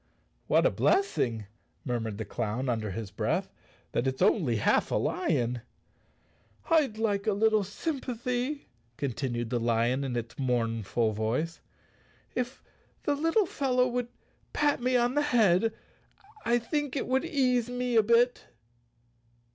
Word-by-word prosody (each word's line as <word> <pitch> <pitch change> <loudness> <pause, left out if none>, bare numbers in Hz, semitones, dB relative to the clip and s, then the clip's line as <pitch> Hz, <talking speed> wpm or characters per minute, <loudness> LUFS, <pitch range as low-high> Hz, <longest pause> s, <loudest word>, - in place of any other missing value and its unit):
"What - - +4
a - - +4
blessing," 120 - +1 0.4
murmured 115 -5 -2
the 110 - -4
clown 115 +5 -2
under 110 -3 -1
his 100 +1 -5
breath, - - -1 0.2
" - - -33
that 120 - 0
it's 130 0 -2
only 170 - +3
half 105 - +2
a - - 0
lion." 120 0 0 1.1
"I'd 290 -9 +3
like 205 -2 0
a 215 - +3
little 215 +1 +3
sympathy," 250 - -3 0.3
continued 120 -3 -2
the 120 - +1
lion 120 +3 +1
in 130 -3 -3
its 115 +1 -5
mournful 115 -3 0
voice. 115 +10 -2 0.7
"If 250 +1 -3 0.4
the 290 - +1
little 330 +8 +2
fellow 255 -5 +1
would 245 -1 -2 0.5
pat 290 -3 +2
me 250 +1 +2
on 240 +1 +2
the 295 - +2
head 225 -7 +3 0.7
I 240 +1 +3
think, 290 +3 -2
it 270 - -1
would 260 +2 +1
ease 255 -7 +1
me 245 -1 -1
a 225 - +7
bit." 235 +3 +2
215 Hz, 140 wpm, -29 LUFS, -, 1.1 s, a